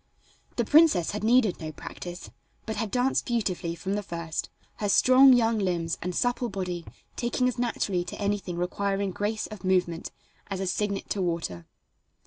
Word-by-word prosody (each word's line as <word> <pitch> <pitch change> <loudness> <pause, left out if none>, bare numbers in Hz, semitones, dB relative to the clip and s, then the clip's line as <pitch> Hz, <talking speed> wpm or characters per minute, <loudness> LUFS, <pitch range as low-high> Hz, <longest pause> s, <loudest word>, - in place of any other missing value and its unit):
The - - 0
princess 300 - +5
had 210 0 -4
needed 225 -3 +3
no 155 -1 -5
practice, 175 +3 -8 0.3
but 220 - -3
had 220 0 -1
danced 250 +4 +1
beautifully 185 -8 -1
from 190 +3 -3
the 205 - 0
first, 170 -4 -4 0.3
her 205 - -1
strong 260 +5 +7
young 230 -3 +4
limbs 170 -4 -1
and 180 0 -3
supple 245 0 0
body 180 -4 -4 0.3
taking 245 +1 0
as 250 -1 -2
naturally 205 -6 0
to 175 - -7
anything 200 -4 -2
requiring 195 +2 -1
grace 210 +3 -2
of 215 -4 -10
movement 180 -2 +1 0.4
as 195 -2 -4
a 190 - -1
cygnet 200 +2 -1
to 200 - 0
water. 165 - -3
200 Hz, 165 wpm, -27 LUFS, 175-225 Hz, 0.4 s, strong